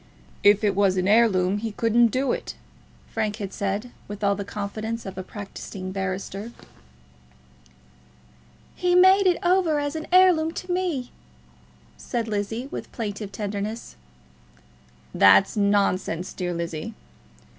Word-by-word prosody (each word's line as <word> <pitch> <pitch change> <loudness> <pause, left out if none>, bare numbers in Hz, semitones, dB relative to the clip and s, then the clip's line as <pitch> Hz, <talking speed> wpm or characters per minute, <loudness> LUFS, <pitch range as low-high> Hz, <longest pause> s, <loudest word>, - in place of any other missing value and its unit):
"If 205 +1 +5
it 205 -2 +2
was 195 -2 +2
an 185 0 +1
heirloom 205 -3 +3
he 220 0 -4
couldn't 230 +2 +3
do 260 +4 0
it," - - -4 0.6
Frank 215 -2 -1
had 200 -3 -6
said, 200 +4 -3 0.2
with 205 0 -7
all 200 0 +3
the 200 0 -4
confidence 215 +3 -5
of 195 - -7
a 185 - -4
practising 190 -1 -8
barrister. 195 +3 -4 2.2
"He 355 0 +1
made 375 +2 +6
it 355 - +3
over 350 -3 +3
as 290 +1 -3
an 315 0 -5
heirloom 355 -3 +5
to 365 +1 -6
me," 350 -9 -2 0.9
said 235 -2 -3
Lizzie, 220 +4 -3
with - - -7
plaintive 205 -3 -5
tenderness. 205 - -5 1.2
"That's 95 0 +5
nonsense, 200 -3 0
dear 175 -2 -3
Lizzie." 170 +5 -5
210 Hz, 130 wpm, -24 LUFS, 195-245 Hz, 2.2 s, made